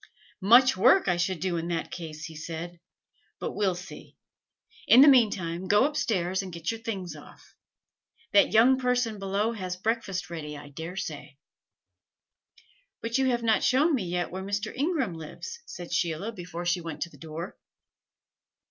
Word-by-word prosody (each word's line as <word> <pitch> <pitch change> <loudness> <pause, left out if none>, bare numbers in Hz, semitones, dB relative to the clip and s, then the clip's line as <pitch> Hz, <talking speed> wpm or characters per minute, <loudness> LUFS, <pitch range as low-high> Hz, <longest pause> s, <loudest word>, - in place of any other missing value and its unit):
"Much 245 +7 +6
work 370 - +5
I 180 - +3
should 175 0 -1
do 175 0 -1
in 165 0 -3
that 170 -1 -3
case!" 160 -2 -7
he 160 -3 -9
said. 165 +2 -6 0.6
"But - - -4
we'll 195 -3 0
see. 185 +2 -11 0.7
In 245 - +8
the 290 - +9
mean 250 -6 +7
time 175 -1 -4
go 205 +6 +5
up 295 +1 -2
stairs 185 -3 0
and 190 -1 -7
get 170 +2 -3
your 225 - -6
things 190 -7 -5
off: 150 - -15 0.8
that 200 - +5
young 245 +4 +5
person 245 -4 0
below 200 +3 0
has 185 -5 -4
breakfast 195 -3 -2
ready, 150 -3 -6
I 145 0 -11
dare 160 +5 -7
say." 150 -6 -6 1.7
"But 230 +3 0
you 265 - +2
have 240 -2 0
not 220 -2 +2
shown 295 +6 +3
me 235 -9 0
yet 175 0 -2
where 190 +1 -5
Mr. 205 +3 -3
Ingram 280 - 0
lives," 165 - -8
said 175 -1 -8
Sheila 175 +5 -1
before 175 -4 -7
she 175 0 +1
went 165 -2 -7
to 170 - -10
the - - -17
door. 165 +2 -7
185 Hz, 175 wpm, -27 LUFS, 170-230 Hz, 1.7 s, the